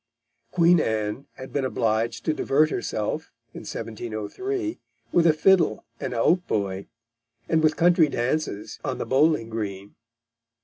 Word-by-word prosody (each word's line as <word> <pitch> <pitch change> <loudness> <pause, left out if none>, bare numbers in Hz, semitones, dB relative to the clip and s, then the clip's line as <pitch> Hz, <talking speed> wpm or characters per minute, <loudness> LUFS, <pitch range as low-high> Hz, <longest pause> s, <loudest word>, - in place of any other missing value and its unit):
Queen 170 +4 +4
Anne 110 +1 -2
had 130 - -10
been 140 - 0
obliged 115 -2 -1
to 155 - +2
divert 155 +1 +2
herself, 115 +7 -3 0.2
in - - -7
1703, 120 - -4 0.3
with 170 -1 +4
a - - +7
fiddle 160 - +3
and - - -4
a - - -2
hautboy, 100 - 0 0.6
and 160 -1 +2
with 155 0 +2
country 170 -2 +5
dances 125 -4 -2
on - - -2
the - - -3
bowling 140 -3 +3
green. 100 -3 -5
130 Hz, 135 wpm, -25 LUFS, 110-160 Hz, 0.6 s, a